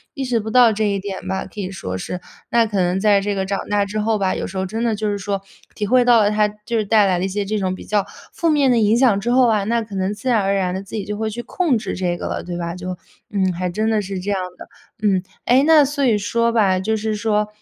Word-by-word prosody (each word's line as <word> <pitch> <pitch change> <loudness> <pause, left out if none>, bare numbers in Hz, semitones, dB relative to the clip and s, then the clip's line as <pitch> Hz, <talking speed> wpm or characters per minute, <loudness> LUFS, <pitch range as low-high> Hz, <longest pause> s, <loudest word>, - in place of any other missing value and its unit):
意 275 - -3
识 245 -2 +1
不 220 0 -5
到 245 -1 +6
这 215 +1 -1
一 200 -1 0
点 190 -1 -6
吧， 190 0 -2
可 - - -11
以 185 - -4
说 95 - -5
是。 180 - -5 0.3
那 235 -1 +3
可 210 -2 -3
能 180 +1 +1
在 205 0 +4
这 205 +1 -1
个 190 -1 -1
长 195 0 -2
大 205 0 +2
之 210 +2 -4
后 220 +1 +1
吧， 190 -1 +1
有 - - -3
时 190 - -7
候 190 - -1
真 220 +4 -3
的 230 -2 +1
就 210 0 -2
是 205 - -2
说， 200 0 -3 0.3
体 210 - -2
会 250 +3 +4
到 240 -2 +6
了 205 - +3
它 210 0 +3
就 210 +3 -6
是 220 - +1
带 210 0 +4
来 185 -2 +2
了 185 - -1
一 - - 0
些 200 +2 -2
这 215 +2 -1
种 185 -1 -1
比 - - -11
较 210 -1 +1 0.3
负 335 - 0
面 285 -3 +3
的 240 - +3
影 215 0 +3
响 240 -6 +4
之 225 +4 -3
后 255 0 +5
啊， 215 -3 +2
那 230 +2 +1
可 215 -2 -13
能 190 +1 -1
自 235 +5 -4
然 230 -4 +3
而 195 +1 +1
然 185 -2 0
地 190 - -3
自 200 - -9
己 205 -3 -3
就 210 - -4
会 220 +1 -2
去 230 +3 -5
控 320 -6 0
制 210 -3 -4
这 175 -2 -1
个 - - -6
了， - - -4
对 175 0 -5
吧？ 170 -1 -3
就， 180 0 -5 0.3
嗯， 190 -3 +1
还 180 +1 -2
真 215 +5 -1
的 215 -1 +2
是 195 -1 -5
这 195 +3 -3
样 195 - 0 0.2
的。 - - -11 0.4
嗯， 190 -2 +2 0.2
哎， 255 +3 +4
那 315 -2 +7
所 285 +1 -2
以 225 -4 +3
说 230 +3 0
吧， 200 -5 +2
就 220 +4 0
是 220 0 -2
说， 210 0 0
210 Hz, 320 characters per minute, -20 LUFS, 190-225 Hz, 0.4 s, 那